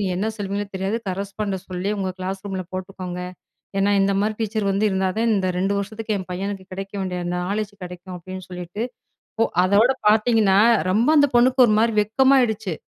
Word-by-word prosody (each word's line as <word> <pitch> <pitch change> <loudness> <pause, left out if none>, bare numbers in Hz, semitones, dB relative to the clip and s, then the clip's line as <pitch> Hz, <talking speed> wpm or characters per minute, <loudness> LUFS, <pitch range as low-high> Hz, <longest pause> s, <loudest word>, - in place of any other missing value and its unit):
நீங்க 190 -2 0
என்ன 215 - 0
சொல்லுவீங்கனு 200 0 -4
தெரியாது 190 +4 -1
கரஸ்பாண்ட 195 +1 -3
சொல்லி, 185 +2 -2
உங்க 190 -1 -1
கிளாஸ் 190 +1 -4
ரூம்ல 190 -2 -3
போட்டுக்கோங்க. 185 -1 -5 0.6
ஏன்னா 200 +1 +3
இந்த 195 0 +2
மாதிரி 215 +1 0
டீச்சர் 215 -2 -1
வந்து 200 +2 +1
இருந்தா 190 -1 0
தா, - - +1
இந்த 190 -1 0
2 195 +2 +1
வருஷத்துக்கு 215 +2 -3
என் 185 - -7
பையனுக்கு 195 +1 -4
கிடைக்க 195 +2 -6
வேண்டிய 185 -2 -3
அந்த 175 0 -2
நாலேட்ஜ் 205 0 -2
கிடைக்கும், 180 +1 -8
அப்படின்னு 185 +1 -8
சொல்லிட்டு, 180 +3 -6 0.6
ஒ - - +5 0.2
அதோட 205 +7 +4 0.2
பார்த்தீங்கன்னா, 215 -3 +4 0.3
ரொம்ப 225 +7 +2
அந்த 285 -1 +5
பொண்ணுக்கு 255 +2 +5
ஒரு 215 - +3
மாரி 230 0 +2
வெட்கமாயிடுச்சு. 220 -4 +2
200 Hz, 175 wpm, -22 LUFS, 185-215 Hz, 0.6 s, ஒ